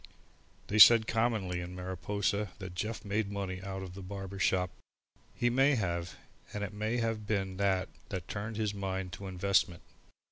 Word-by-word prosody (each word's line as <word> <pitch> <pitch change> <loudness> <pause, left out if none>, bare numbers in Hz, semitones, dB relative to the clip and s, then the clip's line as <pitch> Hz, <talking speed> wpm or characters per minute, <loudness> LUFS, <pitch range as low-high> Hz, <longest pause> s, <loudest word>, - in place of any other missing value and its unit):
They 105 - 0
said 115 +1 +10
commonly 110 -6 0
in 90 +1 -6
Mariposa 95 +3 -1
that 95 -3 -7
Jeff 105 +6 -4
made 100 0 -1
money 95 -2 -3
out 95 0 -5
of 90 -2 -8
the 100 - -8
barber 95 0 -6
shop. 90 -2 +2 0.6
He 120 0 +2
may 135 +3 +4
have, 85 - -2 0.4
and 105 - -3
it 105 - -4
may 110 +3 -1
have 115 -2 -1
been 95 -3 -1
that 95 -2 +1 0.2
that 90 -3 -4
turned 105 +1 -4
his 105 -2 0
mind 95 -2 -3
to 100 +2 -7
investment. 95 -1 +1
100 Hz, 170 wpm, -32 LUFS, 95-105 Hz, 0.6 s, said